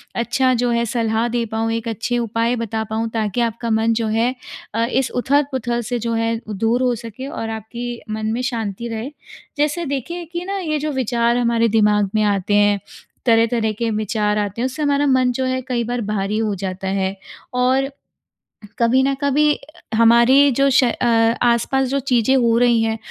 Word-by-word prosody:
अच्छा 255 Hz, +2 st, +1 dB
जो 245 Hz, 0 st, +1 dB
है 235 Hz, 0 st, +1 dB
सलाह 225 Hz, 0 st, 0 dB
दे 240 Hz, 0 st, -1 dB
पाऊँ, 225 Hz, +1 st, -2 dB
एक 230 Hz, 0 st, -3 dB
अच्छे 230 Hz, +2 st, -2 dB
उपाय 230 Hz, +1 st, 0 dB
बता 225 Hz, -1 st, -3 dB
पाऊँ 225 Hz, +1 st, -2 dB
ताकि 220 Hz, 0 st, -1 dB
आपका 235 Hz, 0 st, -2 dB
मन 225 Hz, +1 st, +2 dB
जो 225 Hz, 0 st, -1 dB
है 225 Hz, +3 st, +1 dB, 0.4 s
अ, 230 Hz, +2 st, +1 dB
इस 255 Hz, +2 st, 0 dB
उथल-पुथल 260 Hz, -2 st, 0 dB
से 240 Hz, +2 st, -2 dB
जो 230 Hz, +1 st, -2 dB
है 225 Hz, 0 st, 0 dB
दूर 225 Hz, +4 st, 0 dB
हो 250 Hz, -1 st, +2 dB
सके 230 Hz, +3 st, -8 dB
और 250 Hz, -7 st, -5 dB
आपकी 235 Hz, +2 st, -6 dB
मन 215 Hz, 0 st, -3 dB
में 240 Hz, -, -2 dB
शांति 235 Hz, -3 st, -3 dB
रहे। 225 Hz, +2 st, -4 dB, 0.5 s
जैसे 300 Hz, +4 st, 0 dB
देखिए 305 Hz, +5 st, -4 dB
कि 345 Hz, +1 st, -4 dB
ना 395 Hz, +1 st, -3 dB
ये 310 Hz, -4 st, -2 dB
जो 305 Hz, +1 st, -2 dB
विचार 240 Hz, -2 st, +1 dB
हमारे 235 Hz, -1 st, +2 dB
दिमाग 210 Hz, -2 st, +3 dB
में 215 Hz, -, +3 dB
आते 205 Hz, -1 st, 0 dB
हैं, 205 Hz, 0 st, +3 dB, 0.5 s
तरह-तरह 230 Hz, -1 st, +3 dB
के 230 Hz, -1 st, 0 dB
विचार 210 Hz, -1 st, -1 dB
आते 205 Hz, +2 st, -2 dB
हैं -, -, +1 dB
उससे 265 Hz, +4 st, -3 dB
हमारा 285 Hz, 0 st, +2 dB
मन 260 Hz, -2 st, +3 dB
जो 260 Hz, +2 st, -2 dB
है 255 Hz, 0 st, -1 dB
कई 245 Hz, -2 st, -1 dB
बार 240 Hz, +1 st, -3 dB
भारी 205 Hz, 0 st, -1 dB
हो 215 Hz, -2 st, 0 dB
जाता 190 Hz, 0 st, -5 dB
है। 190 Hz, 0 st, -1 dB, 0.4 s
और 260 Hz, +2 st, +1 dB, 0.9 s
कभी 240 Hz, +3 st, +4 dB
न 275 Hz, +1 st, +1 dB
कभी 295 Hz, +2 st, +3 dB, 0.4 s
हमारी 235 Hz, +5 st, +5 dB
जो 275 Hz, +2 st, +2 dB
श 265 Hz, 0 st, +4 dB
अ, 245 Hz, 0 st, 0 dB, 0.4 s
आसपास 245 Hz, +3 st, +2 dB
जो 275 Hz, +1 st, 0 dB
चीज़ें 255 Hz, -1 st, +2 dB
हो 235 Hz, -2 st, +3 dB
रही 240 Hz, -2 st, +4 dB
हैं 225 Hz, 0 st, -1 dB
235 Hz, 190 wpm, -20 LUFS, 220-255 Hz, 0.9 s, हमारी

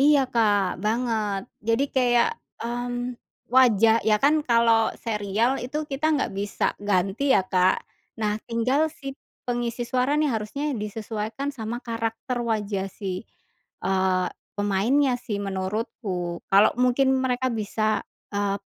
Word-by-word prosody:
Iya, 290 Hz, 0 st, +6 dB
Kak, 205 Hz, -6 st, +2 dB
banget. 220 Hz, -3 st, 0 dB, 0.3 s
Jadi 230 Hz, +5 st, +3 dB
kayak, 245 Hz, -2 st, +3 dB, 0.3 s
mmm, 245 Hz, +1 st, -3 dB, 0.3 s
wajah 230 Hz, -3 st, +5 dB
ya 215 Hz, -1 st, +5 dB
kan, 290 Hz, +2 st, +5 dB
kalau 230 Hz, -1 st, +4 dB
serial 220 Hz, +3 st, 0 dB
itu 295 Hz, +5 st, -3 dB
kita 275 Hz, +3 st, -1 dB
nggak 280 Hz, -7 st, -1 dB
bisa 205 Hz, 0 st, -1 dB
ganti 205 Hz, +7 st, +1 dB
ya, 190 Hz, -, +4 dB
Kak. 185 Hz, 0 st, +2 dB, 0.4 s
Nah, 210 Hz, 0 st, 0 dB
tinggal 250 Hz, +6 st, +2 dB
si 275 Hz, -2 st, -8 dB, 0.2 s
pengisi 240 Hz, -1 st, -2 dB
suara 255 Hz, +3 st, +1 dB
nih, 300 Hz, -1 st, +2 dB
harusnya 240 Hz, +7 st, -2 dB
disesuaikan 220 Hz, +4 st, -4 dB
sama 240 Hz, -2 st, -5 dB
karakter 230 Hz, +2 st, -3 dB
wajah 210 Hz, -4 st, -1 dB
si, 195 Hz, 0 st, -5 dB, 0.6 s
eee, 190 Hz, -1 st, +1 dB, 0.3 s
pemainnya 220 Hz, +7 st, +2 dB
sih 210 Hz, -4 st, -4 dB
menurutku, 190 Hz, -2 st, -3 dB
kalau 200 Hz, +2 st, +6 dB
mungkin 250 Hz, +2 st, +3 dB
mereka 260 Hz, 0 st, 0 dB
bisa, 215 Hz, -1 st, -1 dB, 0.3 s
eee, 200 Hz, -1 st, 0 dB
230 Hz, 125 wpm, -25 LUFS, 205-250 Hz, 0.6 s, Iya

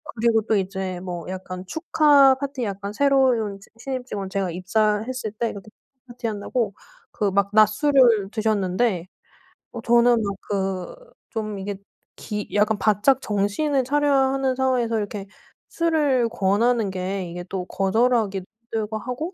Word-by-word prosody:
그리고 225 Hz, -1 st, +2 dB
또 220 Hz, +1 st, 0 dB
이제 190 Hz, -2 st, -2 dB
뭐 175 Hz, -2 st, -6 dB
약간 185 Hz, 0 st, -6 dB
축하 290 Hz, -, +4 dB
파티 275 Hz, -1 st, -4 dB
약간 200 Hz, -1 st, -4 dB
새로운 255 Hz, -6 st, +2 dB
지 195 Hz, -, -18 dB
신입 255 Hz, 0 st, -4 dB
직원 200 Hz, -5 st, -5 dB
제가 190 Hz, -2 st, -2 dB
입사했을 215 Hz, +6 st, -1 dB
때 230 Hz, +1 st, -2 dB
그때 200 Hz, +1 st, -10 dB, 0.4 s
파티한다고 230 Hz, -2 st, -3 dB, 0.4 s
그 205 Hz, -2 st, -1 dB
막 200 Hz, 0 st, +1 dB
낮술을 215 Hz, 0 st, +4 dB
드셨는데 210 Hz, -3 st, 0 dB, 0.6 s
어 235 Hz, -, -7 dB
저는 235 Hz, 0 st, +4 dB
막 200 Hz, -1 st, -2 dB
그 190 Hz, -2 st, -2 dB, 0.4 s
좀 215 Hz, -4 st, -4 dB
이게 200 Hz, +1 st, -5 dB, 0.4 s
기 210 Hz, -1 st, -5 dB
약간 210 Hz, +1 st, +2 dB
바짝 215 Hz, +6 st, +2 dB
정신을 215 Hz, +7 st, 0 dB
차려야 275 Hz, -1 st, +2 dB
하는 270 Hz, -1 st, 0 dB
상황에서 250 Hz, -3 st, +1 dB
이렇게 205 Hz, -1 st, -4 dB, 0.4 s
술을 300 Hz, -7 st, +1 dB
권하는 225 Hz, +1 st, +1 dB
게 185 Hz, 0 st, -3 dB
이게 175 Hz, +1 st, -6 dB
또 190 Hz, -2 st, -3 dB
거절하기도 205 Hz, -1 st, +1 dB, 0.3 s
힘들고 220 Hz, -1 st, -2 dB
하고 255 Hz, -, -5 dB
215 Hz, 290 characters per minute, -23 LUFS, 195-250 Hz, 0.6 s, 축하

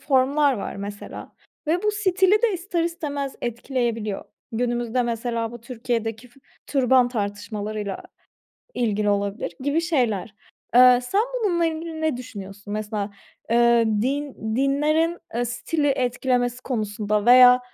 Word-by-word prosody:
formlar 280 Hz, +1 st, +3 dB
var 200 Hz, -, -5 dB
mesela 205 Hz, +1 st, -7 dB, 0.3 s
ve 335 Hz, +4 st, +1 dB
bu 425 Hz, -, +2 dB
stili 400 Hz, 0 st, +3 dB
de 470 Hz, -3 st, +3 dB
ister 355 Hz, -2 st, -1 dB
istemez 290 Hz, -5 st, -3 dB
etkileyebiliyor. 235 Hz, -3 st, -2 dB, 0.3 s
Günümüzde 240 Hz, +1 st, 0 dB
mesela 230 Hz, -1 st, -2 dB
bu 240 Hz, -, -9 dB
Türkiye'deki 230 Hz, -1 st, -3 dB
f 245 Hz, +3 st, -23 dB, 0.3 s
türban 255 Hz, -2 st, +3 dB
tartışmalarıyla 210 Hz, -2 st, -4 dB, 0.7 s
ilgili 210 Hz, -3 st, 0 dB
olabilir 200 Hz, -2 st, -1 dB
gibi 285 Hz, +4 st, +1 dB
şeyler. 240 Hz, -, 0 dB, 0.4 s
Eee, 250 Hz, 0 st, +8 dB
sen 390 Hz, +12 st, +1 dB, 0.2 s
bununla 345 Hz, -4 st, +2 dB
ilgili 320 Hz, 0 st, -4 dB
ne 315 Hz, -4 st, 0 dB
düşünüyorsun? 205 Hz, -4 st, -9 dB
Mesela, 210 Hz, -1 st, -3 dB, 0.4 s
eee, 235 Hz, 0 st, +5 dB, 0.2 s
din 265 Hz, -4 st, -2 dB
dinlerin, 305 Hz, +5 st, +2 dB, 0.2 s
eee, 240 Hz, +1 st, 0 dB
stili 250 Hz, +6 st, -1 dB
etkilemesi 250 Hz, -1 st, 0 dB
konusunda 210 Hz, -3 st, -1 dB
veya, 250 Hz, 0 st, +8 dB
245 Hz, 120 wpm, -23 LUFS, 220-285 Hz, 0.7 s, Eee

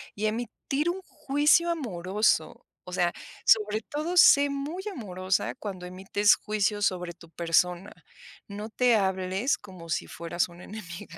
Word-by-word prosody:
y 210 Hz, -, -2 dB
a -, -, +3 dB
emitir 245 Hz, +7 st, -2 dB
un 370 Hz, +2 st, -3 dB
juicio 300 Hz, +1 st, +2 dB
amoroso, 200 Hz, -, 0 dB, 0.2 s
o 180 Hz, -, -9 dB
sea, 175 Hz, -2 st, +1 dB, 0.3 s
sobre 215 Hz, 0 st, +4 dB
todo, 305 Hz, +9 st, -4 dB
sé 285 Hz, -4 st, +7 dB
muy 285 Hz, +6 st, -4 dB
amorosa 185 Hz, -, -2 dB
cuando 190 Hz, -4 st, -7 dB
emites 195 Hz, +3 st, +2 dB
juicios 210 Hz, -1 st, 0 dB
sobre 180 Hz, -2 st, -1 dB
tu 170 Hz, 0 st, -17 dB
persona. 175 Hz, +3 st, 0 dB, 0.6 s
No 210 Hz, +2 st, -7 dB
te 245 Hz, +1 st, +3 dB
hables 190 Hz, +4 st, 0 dB
como 185 Hz, -5 st, -12 dB
si 160 Hz, -, -1 dB
fueras 170 Hz, +1 st, -2 dB
una 175 Hz, +1 st, -13 dB
enemiga. 170 Hz, -5 st, -9 dB
205 Hz, 145 wpm, -27 LUFS, 180-250 Hz, 0.6 s, sé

